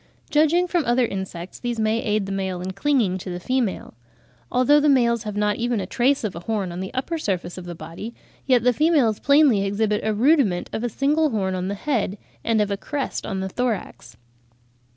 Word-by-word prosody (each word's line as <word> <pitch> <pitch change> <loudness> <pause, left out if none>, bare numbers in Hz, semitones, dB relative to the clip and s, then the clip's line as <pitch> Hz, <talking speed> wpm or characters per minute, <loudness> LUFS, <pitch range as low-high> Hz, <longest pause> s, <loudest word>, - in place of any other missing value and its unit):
Judging 315 +4 +4
from 350 -2 0
other 240 +1 +3
insects, 190 -4 -6
these 240 -2 -3
may 220 +1 +1
aid 215 -4 0
the 195 - -5
male 190 -2 -2
in 185 +1 -4
clinging 215 -5 +1
to 185 - -7
the 175 0 -4
female. 250 0 -2 0.6
Although 255 +4 +4
the 295 0 +3
males 235 -4 +3
have 210 -1 -4
not 210 0 +1
even 240 -1 0
a 190 - -3
trace 260 +8 +1
of 210 -4 -3
a - - -5
horn 195 -1 -2
on 175 - -6
the 190 0 -5
upper 320 +6 -2
surface 180 - -2
of 185 - -8
the 175 -1 -6
body, 165 +9 -8 0.3
yet 250 -4 +4
the 250 0 +4
females 280 -6 +2
plainly 280 -8 +4
exhibit 210 +1 0
a 220 - +1
rudiment 230 - +2
of 220 - -3
a 240 - 0
single 295 +6 +1
horn 195 -6 -1
on 185 0 -2
the 200 - -2
head 225 -4 -1
(Fig. - - -11
22, - - -33
a), - - -12
and 220 -2 +3
of 205 - -4
a 200 - -1
crest 285 +5 -3
(b) - - -5
on 190 -2 -2
the 190 - -3
thorax. 240 0 -3
220 Hz, 230 wpm, -23 LUFS, 190-260 Hz, 0.6 s, Judging